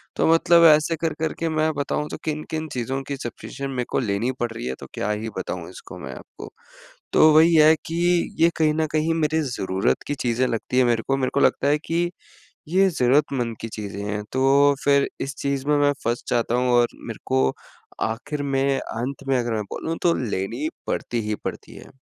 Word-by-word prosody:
तो - - +2
मतलब 170 0 +5
ऐसे 155 +2 0
कर 165 -2 0
करके 160 +1 -2
मैं 155 0 +1
बताऊँ, 145 +1 -2
तो - - -5
किन-किन 155 +1 -3
चीज़ों 130 +2 -2
की 140 - -3
सब्सक्रिप्शन 135 +3 -6
मेरे 125 -2 -2
को - - 0
लेनी 115 +2 0
पड़ 120 -1 -1
रही 85 - -6
है, 65 - -2
तो - - -9
क्या 105 - -2
ही 105 +2 -3
बताऊँ - - -5
इसको 485 - -11
मैं - - -7
आपको? - - -11 0.6
तो 155 - +7
वही 160 +2 +6
है 155 0 +7
कि 165 - -4 0.4
ये 165 +1 +6
कहीं 155 -1 +3
न 160 +1 +1
कहीं 155 +1 +1
मेरे 160 0 +1
ज़रूरत 95 -1 0
की 145 - -1
चीज़ें 120 +1 +1
लगती 115 +2 -2
हैं 130 - +5
मेरे 115 -2 +1
को। 135 - +1
मेरे 130 -1 0
को - - +3
लगता 140 - +2
है 145 +1 +4
कि 170 +1 0 0.6
ये 190 +4 +4
ज़रूरतमंद 125 -5 +1
की 115 - -5
चीज़ें 100 -2 -6
हैं, 105 0 -3
तो 140 +2 +4
फिर 140 -1 +4
इस 135 +1 -3
चीज़ 140 -1 -2
में 150 - +4
मैं 145 0 +3
फँस 120 +1 -1
जाता 120 -1 +1
हूँ 125 0 +2
और 120 0 +4 0.2
मेरे - - -7
को 65 0 +2 0.6
आखिर 140 +6 -4
में, 135 -1 +1
अंत 130 +5 -5
में 135 -1 +3
अगर 120 -1 -1
मैं 110 - -1
बोलूँ, 165 +1 -3
तो 170 -1 +4 0.2
लेनी 115 +11 -2 0.2
पड़ती 120 - -2
ही 105 - 0
पड़ती - - -6
है। 135 - -14
135 Hz, 205 wpm, -23 LUFS, 120-155 Hz, 0.6 s, तो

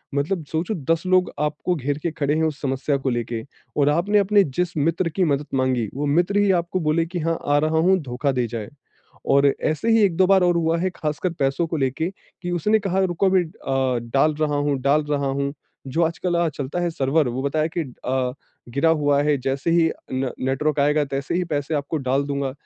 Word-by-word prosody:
मतलब 160 +5 -1
सोचो 165 +6 -1 0.2
10 165 - -3
लोग 185 0 +3
आपको 150 +4 -1
घेर 145 -1 -2
के 170 - 0
खड़े 145 -1 -1
है 160 - +1
उस 155 -2 -3
समस्या 135 +1 0
को 135 0 -2
लेके, 120 -2 -3 0.3
और 145 -1 +4
आपने 175 +8 +2
अपने 200 0 +4
जिस 175 +3 -2
मित्र 165 +4 +1
की 185 +4 0
मदद 145 -3 +1
माँगी 130 -4 +1
वो 145 +2 -2
मित्र 175 +7 +2
ही 205 -1 +4
आपको 175 0 0
बोले 165 0 +1
कि 175 +1 -5
हाँ, 165 +1 0
आ 145 0 +3
रहा 155 +2 +1
हूँ 185 +4 +4
धोखा 135 +1 -1
दे 125 -2 0
जाए। 115 -2 -6 0.6
और 140 +1 +5
ऐसे 155 +9 -1
ही 225 -1 +5
1-2 185 -2 +3
बार 190 0 +5
और 175 -1 +3
हुआ 165 0 +1
है 185 +2 0
ख़ासकर 155 +4 -2
पैसों 135 +5 +1
को 165 - -3
लेके 135 +4 -1 0.3
कि 175 - -3
उसने 210 +6 +2
कहा 195 -2 -1
रुको 180 +1 0
अभी 185 -1 +4
अ, 135 -5 -1
डाल 150 +3 +3
रहा 150 -1 +1
हूँ, 145 -1 0
डाल 145 +3 +3
रहा 140 -1 0
हूँ, 140 +1 -1 0.3
जो 135 +6 0
आजकल 170 +2 -1
अ, 170 -1 +2
चलता 145 +2 -4
है 175 -1 0
सर्वर 145 -1 +1
वो 125 +2 -3
बताया 155 +3 0
कि - - +2 0.2
अ, 130 -1 0 0.4
गिरा 140 +7 +1
हुआ 145 -3 +2
है 150 0 +2
जैसे 135 +5 -1
ही 165 -1 +3 0.2
न 130 0 -1
नेटवर्क 145 +3 0
आएगा 150 +1 +3
तैसे 140 +1 -3
ही 180 +1 +1
पैसे 150 -2 -2
आपको 145 +2 -2
डाल 135 0 0
दूँगा, 140 -2 -2
150 Hz, 215 wpm, -22 LUFS, 140-170 Hz, 0.6 s, और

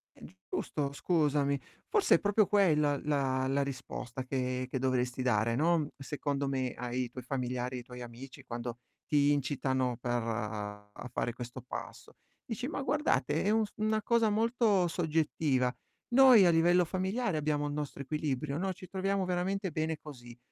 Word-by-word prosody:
È - - -18 0.3
giusto, 140 -2 -2
scusami. 145 -3 +1 0.3
Forse 420 -3 +4
è - - -6
proprio 205 0 +3
quella 150 -8 +3
la 135 -3 0
la 140 +1 +1
risposta 130 -2 -5
che 130 -1 -2
che 130 - -1
dovresti 125 -1 0
dare, 115 -1 +2
non- 160 0 +2
secondo 140 0 -2
me- 130 -2 -1
ai 125 +1 -2
tuoi 125 -1 -8
familiari, 125 -1 -2
ai - - -6
tuoi 125 0 -9
amici 120 +3 -10
quando 120 0 -5 0.3
ti 145 -1 +4
incitano 130 -3 0
per 120 0 -1
a 105 0 -5
fare 120 - -1
questo 120 0 -8
passo. - - -8 0.3
Dici: 250 +2 -4
"Ma 275 - -3
guardate, 275 - +1
è 200 - 0
un 220 0 +3
s 205 - -9
una 215 0 0
cosa 230 0 +3
molto 220 -3 +2
soggettiva. 155 -6 0 0.3
Noi 250 -5 +8
a 175 - +6
livello 175 +2 +4
familiare 190 +1 -1
abbiamo 145 -1 0
il 145 - -3
nostro 145 -1 -4
equilibrio, 150 0 -2
no, 190 +1 -1
ci 185 - -11
troviamo 195 0 -1
veramente 185 +1 -1
bene 155 +1 -1
così, 120 -5 -11
145 Hz, 160 wpm, -31 LUFS, 125-180 Hz, 0.3 s, Noi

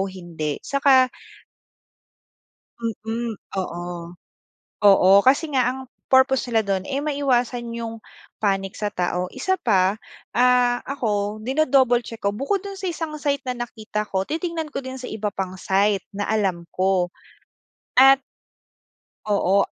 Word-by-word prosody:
hindi 170 -6 -5
saka 270 -2 +4 1.7
Mm, 225 +1 -3 0.2
oo. 175 -2 -3 1.0
Oo, 195 -2 +6 0.2
kasi 280 +5 +4
nga 255 -2 +3
ang 260 - -5 0.3
purpose 260 0 +4
nila 225 -1 +3
dun 190 -1 0
eh, 275 0 -2
maiwasan 250 -5 0
yung 225 -1 -5 0.4
panic 195 -1 0
sa 210 -1 -2
tao, 180 0 -1
isa 375 +9 0
pa, 195 - +2 0.4
ah, 250 0 +4
ako, 215 -6 -2
dino-double 260 -1 +3
check 230 - -8
ko 200 - +1
bukod 315 - 0
dun 395 - -6
sa 380 -1 -3
isang 320 -2 -5
site 285 -1 -1
na 250 - -2
nakita 215 -2 -5
ko, 190 -2 -1
titingnan 330 0 -3
ko 275 - -3
din 260 0 -6
sa 250 - -6
iba 215 -1 -3
pang 190 -1 -4
site 195 +1 +1
na 205 0 -3
alam 190 -6 0
ko. 185 -1 +2 0.9
At 270 +1 +8 1.0
Oo. 200 -1 +2
230 Hz, 135 wpm, -23 LUFS, 195-265 Hz, 1.7 s, At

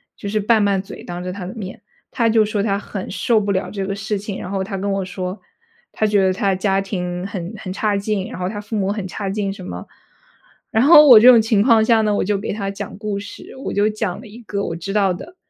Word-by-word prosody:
就 200 - -6
是 215 +1 0
拌 215 +1 +3
拌 200 -2 +1
嘴 195 - -11
当 175 0 -6
着 180 0 -5
他 190 -2 -6
的 185 - -6
面， 195 -3 -7 0.3
他 230 -2 +1
就 220 -1 +4
说 210 -1 -1
他 200 -2 0
很 195 -2 -7
受 225 +2 +1
不 200 0 -1
了 190 -1 -1
这 195 -2 -4
个 195 - -3
事 205 +1 -3
情， 200 0 -6
然 180 - -6
后 195 -1 -1
他 195 0 -5
跟 200 +1 -2
我 195 0 -1
说， 185 +2 -5 0.5
他 215 - -1
觉 205 -2 +3
得 190 0 +3
他 200 0 0
的 190 - +2
家 195 0 +1
庭 180 -2 -4
很 190 -1 -6
很 185 -3 -6
差 205 0 0
劲， 200 -1 -2
然 - - -8
后 180 - -2
他 205 -1 -5
父 215 +2 -6
母 200 -1 0
很 205 -3 -4
差 200 +2 -5
劲 200 0 -2
什 195 -2 -9
么。 90 +1 -7 0.8
然 220 +3 +3
后 300 0 +8
我 235 -5 +10
这 240 - +6
种 235 -3 +8
情 220 -2 +2
况 225 -2 +5
下 225 -1 +4
呢， 210 -1 +1
我 - - +1
就 205 +1 0
给 205 - -4
他 200 -2 -3
讲 200 0 -7
故 210 -2 -3
事。 205 - -10
我 - - -3
就 205 +1 +2
讲 210 -3 -3
了 245 - -12
一 215 +3 -12
个 200 -1 -3
我 165 - -4
知 175 +4 -6
道 195 -3 +2
的， 345 - -10
200 Hz, 290 characters per minute, -20 LUFS, 190-215 Hz, 0.8 s, 我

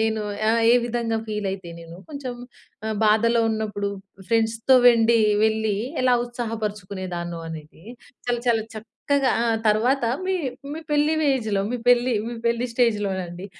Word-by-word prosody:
నేను 220 0 0 0.3
ఆ! - - +5 0.2
ఏ - - +6
విధంగా 235 -1 -1
ఫీల్ 210 -2 -3
అయితే 190 -2 -8
నేను 165 +1 -11
కొంచెం 275 -4 -5 0.5
ఆహ్, 220 -1 -2
బాధలో 230 +2 +3
ఉన్నప్పుడు 215 -2 -2 0.4
ఫ్రెండ్స్‌తో 225 +2 +2
వెండి 230 -1 +4 0.3
వెళ్లి 220 -2 0 0.3
ఎలా 255 -1 +4
ఉత్సాహపరుచుకునేదాన్నో 200 -7 -5
అనేది, 160 0 -10 0.4
చాలా, 245 0 0
చాలా 230 -2 +3
చక్కగా 260 +5 -1
ఆ! - - +1 0.2
తరువాత 235 +5 +2 0.2
మీ 380 - 0 0.4
మీ 315 - -5
పెళ్లి 295 +1 +2
వేజలో, 235 -9 +1
మీ 250 - 0
పెళ్లి 245 +1 +4 0.3
పెళ్లి 235 +1 +1
స్టేజ్‌లో 220 -4 +1
నండి 175 +1 -7
225 Hz, 135 wpm, -23 LUFS, 205-240 Hz, 0.5 s, ఏ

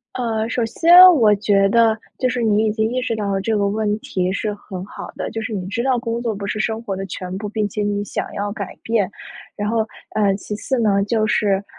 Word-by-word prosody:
呃， 225 -3 -1
首 235 +1 -1
先 330 +9 +2 0.2
我 220 -8 +5
觉 200 -1 +2
得 225 0 +4 0.2
就 255 - +1
是 245 0 -2
你 215 0 +2
已 - - +2
经 220 +1 0
意 255 - 0
识 230 -3 -2
到 205 -2 -2
了 195 - 0
这 220 +2 0
个 200 -1 +1
问 210 0 -1
题 185 -3 -2
是 210 +2 -2
很 190 -3 -8
好 200 - -9
的。 - - -4
就 225 - -4
是 225 -1 -4
你 185 -2 -4
知 230 +4 -2
道 255 -1 +1
工 235 -1 -3
作 230 -2 -2
不 200 0 -5
是 210 +1 -3
生 225 +1 -1
活 200 -4 -4
的 195 0 -5
全 185 0 -6
部， 210 0 -5
并 215 0 -1
且 210 +1 -3
你 205 0 -1
想 - - -4
要 205 0 -3
改 200 -3 -6
变。 215 -4 0 0.5
然 205 0 -2
后， 225 -1 0 0.3
呃， 205 -2 +2
其 210 +1 -6
次 255 +5 -2
呢， 200 -3 +2
就 215 0 0
是， 200 -2 +1
215 Hz, 265 characters per minute, -20 LUFS, 200-230 Hz, 0.5 s, 我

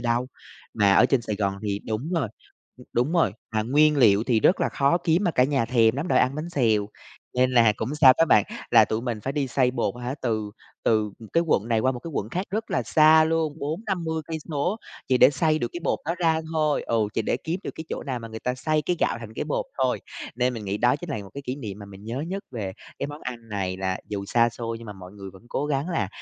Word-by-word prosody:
đâu, 120 +1 0 0.5
mà 100 -1 +4
ở 120 +5 +6
trên 130 -3 +1
Sài 105 -2 -3
Gòn 100 -1 0
thì 100 -1 -2
đúng 110 +9 -3
rồi, 150 -10 0 0.6
đúng 125 +7 +1
rồi, 170 -2 +3 0.2
mà 110 - +2
nguyên 150 +5 +4
liệu 110 -6 +5
thì 115 -3 +2
rất 185 - +4
là - - +2
khó 140 +5 +2
kiếm 170 +3 +1
mà 175 - +3
cả 125 -5 +3
nhà 135 -3 +1
thèm 115 -1 +3
lắm 150 +6 -3
rồi - - +4
ăn 130 - +2
bánh 155 +3 -4
xèo, 110 -9 +2 0.5
nên 125 0 +3
là 115 -3 +5
cũng 125 +7 -3
sao 140 -4 +8
các 165 - +6
bạn, 105 - +5 0.3
là - - +7
tụi 110 +1 -2
mình 120 -4 -3
phải 135 - -3
đi 140 -1 -1
xay 125 0 +2
bột, 120 -5 -1
hả, 125 +2 -3
từ 110 -4 -1 0.3
từ, 110 -2 +2
ừm, 110 -2 -12
cái 170 - +3
quận 115 -7 +1
này 115 -2 +2
qua 130 +3 +2
một 125 - -6
cái 165 - -7
quận 105 - -2
khác 185 - -3
rất 220 +2 -3
là - - +1
xa 155 0 +6
luôn 160 -1 0
40-50 160 0 -3
cây 160 -1 -4
số, 160 +7 -1 0.3
chỉ 130 -1 +3
để 130 - +7
xay 155 +2 +1
được 120 - -2
cái 175 - -5
bột - - +1
đó 165 - 0
ra 160 -2 +2
thôi. 155 -2 +1
Ừ, 115 - -1 0.2
chỉ 115 - 0
để 110 - 0
kiếm 170 +3 -2
được - - -4
cái 160 - -7
chỗ - - -4
nào 130 -3 -3
mà 115 - -8
người 110 0 -8
ta 125 0 -1
xay 155 +4 0
cái 175 +4 -1
gạo - - +1
thành 110 -1 -9
cái - - -3
bột - - -1
thôi, - - +1 0.4
nên 125 0 +1
mình 110 - -6
nghĩ 100 +1 -2
đó 120 +5 +3
chính 170 +2 -8
là 140 - -2
một 95 - -13
cái 140 - -6
kỷ 130 0 -4
niệm 105 -7 -7
mà 100 - -9
mình 100 +1 -13
nhớ 120 +5 -4
nhất 190 +5 -4
về 105 -7 -4 0.3
cái - - -2
món 145 +1 -8
ăn 115 -2 -7
này 95 -3 -2
là 95 0 -2
dù 100 -1 -4
xa 115 +2 +3
xôi 115 -1 -5
nhưng 115 - -11
mà 105 - -6
mọi 95 -1 -12
người 100 -2 -9
vẫn 95 - -15
cố 145 - -2
gắng 145 +2 -1
là 120 - -1
125 Hz, 270 wpm, -25 LUFS, 110-155 Hz, 0.6 s, sao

